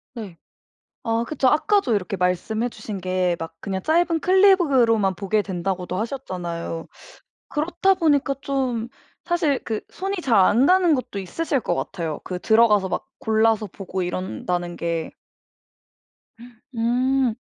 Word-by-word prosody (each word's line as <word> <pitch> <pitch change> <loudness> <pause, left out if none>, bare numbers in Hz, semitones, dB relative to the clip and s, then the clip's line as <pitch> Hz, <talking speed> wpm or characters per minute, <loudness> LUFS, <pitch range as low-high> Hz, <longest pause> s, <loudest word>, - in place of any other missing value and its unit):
네. 205 -8 -8 0.7
아 230 0 0
그쵸. 270 -2 +1
아까도 310 - +2
이렇게 195 -1 -2
말씀해 185 +6 0
주신 215 -3 -7
게 185 -1 0
막 165 0 -6
그냥 190 -1 -4
짧은 330 - +2
클립으로만 280 - +4
보게 205 +3 0
된다고도 185 -1 -3
하셨잖아요. 175 -9 -4 0.6
그렇다 350 +5 +1
보니까 290 -6 +2
좀 255 -5 -2 0.4
사실 330 -6 0
그 220 -2 -2
손이 390 +2 -3
잘 245 -7 +2
안 235 +7 +4
가는 360 -2 +4
것도 255 -6 -4
있으실 270 - -2
것 - - -1
같아요. 165 -4 -4
그 180 - -4
들어가서 215 -1 +4
막 - - -3
골라서 220 0 +2
보고 190 -1 -5
이런다는 180 -1 -3
게. 170 -1 -3 1.6
음. 250 +1 +1
225 Hz, 270 characters per minute, -23 LUFS, 185-275 Hz, 1.6 s, 클립으로만